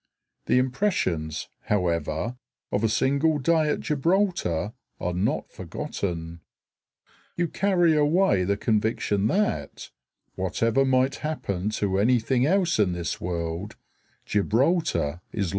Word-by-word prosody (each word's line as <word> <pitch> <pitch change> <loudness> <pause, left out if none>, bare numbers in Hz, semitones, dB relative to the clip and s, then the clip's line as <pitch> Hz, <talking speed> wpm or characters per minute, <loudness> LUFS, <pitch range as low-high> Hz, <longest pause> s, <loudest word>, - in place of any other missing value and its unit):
The - - +3
impressions, 125 - 0 0.2
however, 85 +2 -1 0.4
of 105 - 0
a 110 - +3
single 140 +7 +2
day 155 +2 +2
at - - -1
Gibraltar 150 - 0 0.3
are 90 - -2
not 90 +4 -1
forgotten. 85 -3 -5 1.0
You 175 0 +1
carry 175 -2 +2
away 150 - +3
the 100 +2 0
conviction 105 -2 +1
that, 170 - -1 0.4
whatever 115 +8 +1
might 130 +1 +2
happen 105 - -3
to 95 -1 0
anything 125 +3 +2
else 180 - +2
in 95 -4 +3
this 85 -1 -4
world, 85 +2 -3 0.5
Gibraltar 105 - +1
is - - -35
likely - - -5
to - - +3
stay. 90 - -2
110 Hz, 125 wpm, -25 LUFS, 90-150 Hz, 1.0 s, The